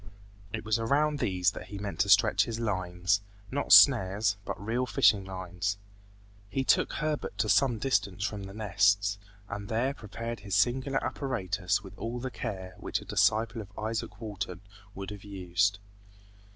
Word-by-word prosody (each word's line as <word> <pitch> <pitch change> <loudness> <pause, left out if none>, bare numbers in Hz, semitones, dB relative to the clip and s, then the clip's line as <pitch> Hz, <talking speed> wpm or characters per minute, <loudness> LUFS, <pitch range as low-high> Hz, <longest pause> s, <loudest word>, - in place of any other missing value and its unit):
It 110 - -5
was 110 +1 +1
around 145 +6 +1
these 90 -4 +1
that 90 - -9
he 100 +1 -7
meant 100 0 -5
to 100 - +2
stretch 95 0 +5
his 115 -1 -4
lines, 95 -2 0 0.3
not 140 +2 -2
snares, 105 -5 +6
but - - -4
real 115 +5 -1
fishing 110 -7 +4
lines. 95 +1 -3 0.7
He 135 +5 -1
took - - +3
Herbert 150 -9 -2
to 110 +1 +1
some 115 +4 +3
distance 100 -6 0
from 100 -1 -3
the 95 - -9
nests, 100 -1 +2 0.3
and 100 -2 -6
there 120 +5 0
prepared 115 -1 -6
his 100 -1 -3
singular 130 +6 +1
apparatus 95 -9 -1
with 95 0 -11
all 115 +2 -3
the 130 +1 -4
care 95 -7 -5
which - - -2
a - - -12
disciple 115 +1 +1
of 100 -1 -12
Izaak 110 -1 -4
Walton 100 -5 -5 0.3
would 95 +1 -6
have 100 -1 -9
used. 100 0 0
105 Hz, 165 wpm, -29 LUFS, 95-115 Hz, 0.7 s, snares